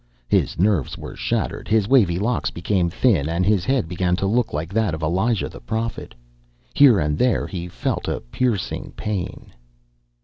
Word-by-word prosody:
His - - +1
nerves 95 - +1
were - - -8
shattered; - - -2
his 105 -2 +2
wavy 105 -10 +4
locks 115 +5 0
became 85 0 0
thin 85 - +2
and 85 +2 0
his 100 -3 +2
head 130 -8 +1
began 90 +1 0
to 95 - -2
look 115 +4 +1
like 80 +5 -4
that 110 -7 +1
of 80 - -7
Elijah 95 +8 +1
the - - -11
Prophet; 110 - -4 0.6
here 135 -7 +6
and 75 -1 -1
there 125 -2 +2
he 90 -3 -5
felt 85 - -3
a - - -1
piercing 110 - -2
pain.... 100 -4 -5
95 Hz, 170 wpm, -22 LUFS, 85-115 Hz, 0.6 s, here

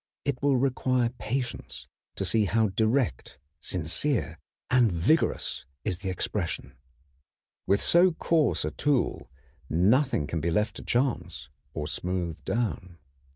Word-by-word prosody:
It 140 -3 -1
will 140 -2 +3
require 130 -2 +1
patience 125 +1 -4 0.3
to - - -2
see 110 -2 +3
how 110 +2 +2
direct, 110 - 0 0.2
sincere, 90 - -1 0.3
and 125 -4 +5
vigorous 85 - +1 0.2
is 90 -5 -1
the 95 -1 -3
expression. 85 - -2 0.9
With 100 +1 +3
so 175 +2 +5
coarse 160 -1 +1
a - - -2
tool 140 - 0 0.4
nothing 105 - +3
can 80 +2 -3
be 85 - 0
left 105 +6 0
to - - -7
chance 125 +1 -1 0.3
or 75 - -2
smoothed 85 -2 -3
down. 95 -7 -2
110 Hz, 125 wpm, -28 LUFS, 85-130 Hz, 0.9 s, and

